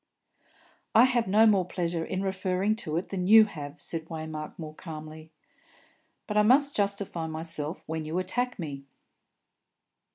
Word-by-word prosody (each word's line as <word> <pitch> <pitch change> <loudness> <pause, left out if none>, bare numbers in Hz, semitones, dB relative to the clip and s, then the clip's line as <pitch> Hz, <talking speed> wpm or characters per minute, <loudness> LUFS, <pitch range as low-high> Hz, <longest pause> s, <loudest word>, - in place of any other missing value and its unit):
"I 230 - +8
have 245 -3 +2
no 215 +4 +5
more 200 -4 +4
pleasure 170 -2 -2
in 190 +3 -3
referring 190 +2 0
to 155 -7 -3
it 175 - -3
than 180 -2 -2
you 220 +1 +9
have," 145 -8 -8
said 165 -1 -4
Waymark, 155 -2 -6
more 155 -2 -7
calmly; 155 -1 -9 1.0
"but 210 - -2
I - - +7
must 275 +6 +4
justify 200 -5 -1
myself 160 -1 -3
when 160 0 -4
you 155 +3 -3
attack 245 +7 -1
me." 140 -6 -6
180 Hz, 150 wpm, -28 LUFS, 160-210 Hz, 1.0 s, you